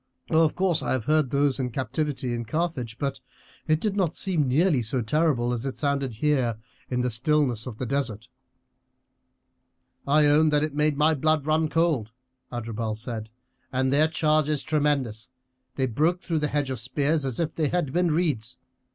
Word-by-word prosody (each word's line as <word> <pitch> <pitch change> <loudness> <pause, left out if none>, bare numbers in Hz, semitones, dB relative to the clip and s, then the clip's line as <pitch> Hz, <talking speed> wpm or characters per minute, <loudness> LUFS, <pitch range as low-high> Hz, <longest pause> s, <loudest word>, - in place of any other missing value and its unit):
Of 160 -1 +3
course 185 -3 +2
I - - -1
have 125 -4 -2
heard 155 -2 +2
those 140 0 +1
in 125 -1 -1
captivity 130 +1 -2
in 120 0 -3
Carthage, 125 -4 -2
but 140 0 -2 0.5
it 155 0 +3
did 205 +1 -1
not 180 -5 0
seem 170 -8 0
nearly 150 +1 +3
so 125 +2 -1
terrible 125 -2 +1
as 120 -1 -3
it 135 -1 -3
sounded 140 -4 -1
here 125 -3 +1 0.3
in 125 -1 0
the 125 0 0
stillness 125 -1 +1
of 115 -4 -7
the 130 - -3
desert." 120 -4 -2 1.8
"I 150 +2 +5
own 150 +2 +5
that 150 0 +2
it 155 -2 -2
made 150 0 +1
my 155 +2 +4
blood 155 0 +1
run 155 0 +1
cold," 155 -10 0 0.4
Adherbal 115 -2 -3
said; 110 -1 -6 0.4
"and 130 +1 +1
their 150 +2 +4
charge 155 -1 +1
is 150 -2 0
tremendous 140 -8 0 0.5
they 130 - +1
broke 155 - 0
through 165 -3 -1
the 150 - 0
hedge 145 -2 -1
of 130 - -3
spears 145 +5 0
as 130 -4 -3
if 160 -2 -1
they 155 -2 0
had 160 -5 -1
been 175 0 +2
reeds. 150 -8 0
140 Hz, 180 wpm, -26 LUFS, 125-155 Hz, 1.8 s, I